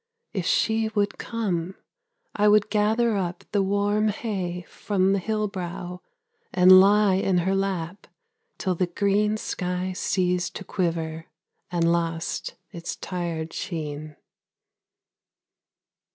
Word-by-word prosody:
If 185 Hz, -4 st, -2 dB
she 220 Hz, 0 st, +2 dB
would 205 Hz, -1 st, 0 dB
come, 190 Hz, -6 st, -2 dB, 0.6 s
I 210 Hz, -, +3 dB
would 210 Hz, 0 st, +4 dB
gather 220 Hz, +2 st, +2 dB
up 180 Hz, -2 st, -3 dB
the 205 Hz, -, +2 dB
warm 205 Hz, +2 st, +1 dB
hay 190 Hz, -5 st, -3 dB
from 195 Hz, -2 st, 0 dB
The 200 Hz, -, +1 dB
hill 215 Hz, +2 st, -1 dB
brow, 180 Hz, -2 st, -6 dB, 0.5 s
and 185 Hz, +1 st, +8 dB
lie 205 Hz, +1 st, +5 dB
in 190 Hz, -1 st, +1 dB
her 185 Hz, +2 st, +1 dB
lap 195 Hz, -2 st, -2 dB, 0.5 s
till 185 Hz, -, 0 dB
the 180 Hz, +1 st, 0 dB
green 205 Hz, +4 st, +1 dB
Sky 180 Hz, -2 st, -3 dB
ceased 180 Hz, -1 st, 0 dB
to -, -, -5 dB
quiver, 165 Hz, -3 st, -2 dB, 0.4 s
and 170 Hz, -1 st, +2 dB
lost 165 Hz, -1 st, -2 dB, 0.2 s
its 170 Hz, 0 st, -5 dB
tired 170 Hz, -3 st, -4 dB
sheen. 155 Hz, -3 st, -5 dB
185 Hz, 120 wpm, -25 LUFS, 175-205 Hz, 0.6 s, and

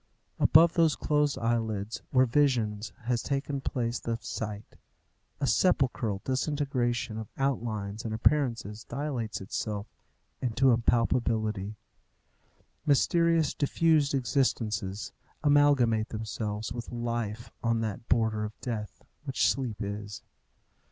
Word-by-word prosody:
Above 165 Hz, +2 st, +6 dB
those 165 Hz, -3 st, +3 dB
closed 150 Hz, -1 st, +1 dB
eyelids, 110 Hz, -2 st, -1 dB
where 130 Hz, 0 st, +4 dB
vision 120 Hz, -5 st, +2 dB, 0.2 s
has 120 Hz, 0 st, 0 dB
taken 140 Hz, 0 st, -2 dB
the -, -, -3 dB
place 120 Hz, -1 st, -1 dB
of 115 Hz, -1 st, -2 dB
sight, 105 Hz, -1 st, -5 dB, 0.6 s
a 140 Hz, -, 0 dB
sepulchral 125 Hz, -, +1 dB
disintegration 130 Hz, -4 st, -1 dB
of 110 Hz, -, -7 dB
outlines 110 Hz, -6 st, -2 dB
and 115 Hz, -, -4 dB
appearances 115 Hz, -3 st, +1 dB
dilates 125 Hz, -6 st, -3 dB
itself 105 Hz, +1 st, -3 dB, 0.6 s
into 130 Hz, +2 st, +3 dB
impalpability. 110 Hz, -3 st, +1 dB, 1.1 s
Mysterious, 165 Hz, +1 st, +3 dB
diffused 150 Hz, -1 st, +2 dB
existences 110 Hz, -6 st, -1 dB, 0.3 s
amalgamate 140 Hz, -7 st, +4 dB
themselves 110 Hz, -1 st, -4 dB
with 120 Hz, -2 st, -6 dB
life 115 Hz, -2 st, -3 dB
on 115 Hz, -1 st, +1 dB
that 110 Hz, 0 st, -4 dB
border 110 Hz, -2 st, +2 dB
of 105 Hz, 0 st, -6 dB
death, 110 Hz, -4 st, -5 dB, 0.2 s
which 135 Hz, -2 st, +2 dB
sleep 125 Hz, -6 st, -1 dB
is. 100 Hz, 0 st, -6 dB
115 Hz, 110 wpm, -29 LUFS, 110-135 Hz, 1.1 s, Above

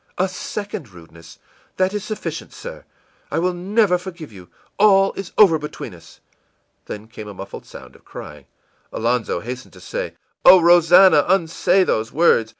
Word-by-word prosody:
î 180 Hz, -, +1 dB
ìA -, -, -4 dB
second 200 Hz, -, -6 dB
rudeness! 85 Hz, -2 st, -15 dB, 0.4 s
That 185 Hz, +1 st, +1 dB
is 210 Hz, -2 st, -3 dB
sufficient, 215 Hz, -, -6 dB
sir. -, -, -10 dB, 0.4 s
I -, -, -3 dB
will 180 Hz, +2 st, 0 dB
never 190 Hz, +1 st, +1 dB
forgive 175 Hz, -6 st, -9 dB
you. 95 Hz, -4 st, -14 dB, 0.3 s
All 195 Hz, -2 st, +5 dB
is 195 Hz, -2 st, -7 dB
over 175 Hz, -7 st, +6 dB
between 150 Hz, 0 st, -8 dB
us.î -, -, -17 dB, 0.7 s
Then 105 Hz, +1 st, -8 dB
came 110 Hz, -1 st, -10 dB
a 105 Hz, -, -9 dB
muffled 95 Hz, +1 st, -9 dB
sound -, -, -13 dB
of -, -, -20 dB
crying. 75 Hz, -2 st, -11 dB, 0.4 s
Alonzo 115 Hz, -6 st, -1 dB
hastened 125 Hz, +4 st, -8 dB
to 90 Hz, -, -15 dB
say: -, -, -5 dB, 0.3 s
ìOh, 185 Hz, -, +9 dB
Rosannah, 175 Hz, -1 st, +6 dB
unsay 185 Hz, +1 st, +2 dB
those 110 Hz, -9 st, -1 dB
words! 140 Hz, -8 st, +3 dB
170 Hz, 160 wpm, -20 LUFS, -, 0.7 s, ìOh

